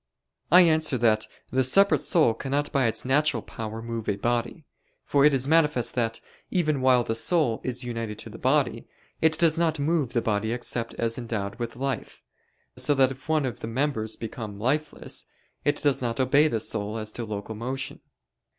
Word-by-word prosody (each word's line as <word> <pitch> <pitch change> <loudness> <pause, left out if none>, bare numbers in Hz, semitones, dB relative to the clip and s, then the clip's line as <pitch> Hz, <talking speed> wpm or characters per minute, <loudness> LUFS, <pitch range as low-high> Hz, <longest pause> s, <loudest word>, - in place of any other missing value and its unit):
I 180 - +9
answer 155 -5 +3
that, 110 -2 +2 0.2
The 130 0 +2
separate 195 - +4
soul 155 - +3
cannot 140 +5 -2
by 135 -3 +2
its 115 - 0
natural 150 +4 +2
power 110 0 -7
move 115 -2 -4
a 100 - +1
body. 120 +7 -2 0.4
For 140 0 +3
it 150 - +6
is 135 -1 +1
manifest 150 -7 +2
that, 115 -2 -1 0.3
even 155 -6 0
while 130 -2 +4
the 115 - -2
soul 120 0 +2
is 125 0 -1
united 115 -3 -4
to - - -8
the - - -10
body, - - +1 0.3
it 160 0 +3
does 165 -1 +3
not 165 -2 +1
move 145 -3 0
the 120 - +2
body 110 +1 0
except 120 -1 -3
as 115 +1 -1
endowed 110 -2 -4
with 120 -1 -4
life: 135 +1 -4 0.5
so 145 - +2
that 135 -1 +4
if 135 +4 -11
one 155 -3 +2
of 120 -5 -4
the - - -5
members 115 -3 -1
become 110 -2 -7
lifeless, 145 +8 -2 0.4
it 145 - +2
does 145 -3 +2
not 120 -1 -2
obey 140 +4 +4
the 115 -7 -1
soul 105 +1 -3
as 110 -1 -4
to 120 - -5
local 105 0 -5
motion. 130 +4 -4
125 Hz, 185 wpm, -26 LUFS, 115-145 Hz, 0.5 s, I